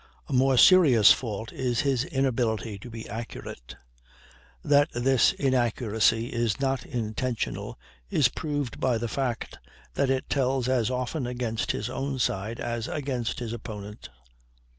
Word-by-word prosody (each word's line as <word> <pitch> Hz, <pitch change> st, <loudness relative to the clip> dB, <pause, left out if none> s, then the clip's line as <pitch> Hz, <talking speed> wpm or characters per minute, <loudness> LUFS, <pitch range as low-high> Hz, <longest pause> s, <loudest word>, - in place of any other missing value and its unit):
A 145 Hz, -, -5 dB
more 130 Hz, 0 st, +3 dB
serious 140 Hz, -, +7 dB
fault 110 Hz, -2 st, -2 dB
is 125 Hz, -3 st, 0 dB
his 135 Hz, -2 st, +1 dB
inability 120 Hz, -, -1 dB
to 120 Hz, -, -10 dB
be 115 Hz, -1 st, -8 dB
accurate. 110 Hz, -, -8 dB, 0.9 s
That 145 Hz, 0 st, +4 dB
this 125 Hz, 0 st, +4 dB
inaccuracy 120 Hz, -3 st, +1 dB
is 115 Hz, -4 st, 0 dB
not 135 Hz, -1 st, 0 dB
intentional 115 Hz, +1 st, -3 dB, 0.3 s
is 140 Hz, -, +4 dB
proved 145 Hz, -4 st, -4 dB
by 125 Hz, -3 st, +1 dB
the 120 Hz, +1 st, -3 dB
fact 125 Hz, 0 st, -3 dB, 0.3 s
that 140 Hz, -2 st, +1 dB
it 135 Hz, -1 st, 0 dB
tells 130 Hz, -2 st, 0 dB
as 125 Hz, -3 st, +1 dB
often 125 Hz, +2 st, -2 dB
against 120 Hz, -1 st, -2 dB
his 105 Hz, -, -3 dB
own 135 Hz, +2 st, -3 dB
side 110 Hz, -1 st, -2 dB
as 120 Hz, 0 st, -3 dB
against 130 Hz, -5 st, -3 dB
his 120 Hz, -2 st, -4 dB
opponents. 105 Hz, -, -8 dB
120 Hz, 140 wpm, -27 LUFS, 115-135 Hz, 0.9 s, serious